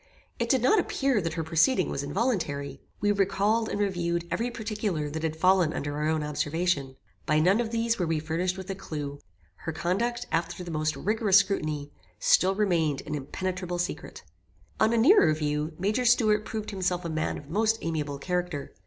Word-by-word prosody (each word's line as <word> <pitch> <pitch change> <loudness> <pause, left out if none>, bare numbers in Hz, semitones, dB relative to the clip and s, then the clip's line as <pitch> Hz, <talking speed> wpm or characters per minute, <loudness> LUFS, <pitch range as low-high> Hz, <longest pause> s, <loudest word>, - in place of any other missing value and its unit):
It 235 0 -1
did 260 -2 +3
not 420 +11 +5
appear 270 - +1
that 165 -2 -3
her 165 -1 -2
proceeding 165 +6 +2
was - - -2
involuntary. 145 - -2 0.2
We 205 +1 +3
recalled 205 +3 +1
and - - -3
reviewed 170 -4 -1
every 235 +2 0
particular 210 -10 -3
that 160 +1 -4
had 160 -1 -2
fallen 180 -1 +3
under 145 0 -3
our 150 +1 -1
own 155 -1 0
observation. 150 -2 -1 0.3
By 155 +1 +3
none 185 +7 +4
of 230 - -3
these 230 0 0
were 175 - 0
we 160 -1 +1
furnished 165 +4 -1
with 190 -1 -7
a - - -1
clue. 150 -7 -6 0.4
Her 160 - -5
conduct, 230 +10 -1
after 165 +2 -1
the 175 - -6
most 155 -1 -1
rigorous 215 -2 +3
scrutiny, 155 -7 0 0.3
still 190 +1 +3
remained 170 -8 +1
an 150 - -5
impenetrable 180 +5 -3
secret. 175 - -4 0.6
On 220 - +4
a 235 - +2
nearer 270 - +6
view, 150 +1 -2
Major 210 +7 0
Stuart 215 -3 +3
proved 220 -1 -4
himself 185 -2 -1
a - - 0
man 155 -1 -2
of 145 - -11
most 220 +7 +1
amiable 150 -4 -2
character. 175 -2 -3
180 Hz, 185 wpm, -27 LUFS, 155-210 Hz, 0.6 s, nearer